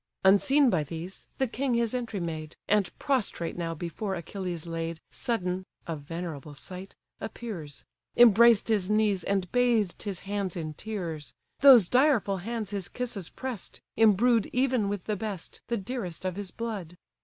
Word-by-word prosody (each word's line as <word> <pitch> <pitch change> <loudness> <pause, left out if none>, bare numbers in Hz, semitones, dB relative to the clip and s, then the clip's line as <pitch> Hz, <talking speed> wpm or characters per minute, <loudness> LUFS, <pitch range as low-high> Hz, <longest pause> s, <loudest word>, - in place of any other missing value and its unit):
Unseen 255 +8 +5
by 160 -4 +2
these, 165 +5 -7
the 265 - +2
king 255 +1 -1
his 235 -1 +1
entry 235 -5 -2
made: 160 -2 -5
And, 205 -2 +3
prostrate 250 - 0
now 165 -1 -3
before 175 +5 -3
Achilles 175 -1 -5
laid, 165 -1 -4
Sudden 185 -6 -1 0.2
(a 165 - -3
venerable 155 -1 -6
sight!) 185 +6 -8 0.2
appears; 175 - -7 0.3
Embraced 235 -1 +7
his 205 -4 +1
knees, 210 -4 +2
and 195 -1 -1
bathed 235 -6 +2
his 195 -4 -4
hands 200 -2 -3
in 155 -3 -4
tears; 170 -6 -5 0.2
Those 255 -9 +9
direful 250 -6 +3
hands 215 +2 -4
his 200 -3 -3
kisses 230 -8 -3
press'd, 255 -7 -6 0.2
embrued 225 +1 +4
Even 250 -5 +2
with 200 -3 -3
the 210 - -1
best, 200 -3 -6
the 235 - 0
dearest 195 -5 -5
of 185 -1 -1
his 200 -1 -5
blood! 195 -5 -5
200 Hz, 155 wpm, -28 LUFS, 175-230 Hz, 0.3 s, Those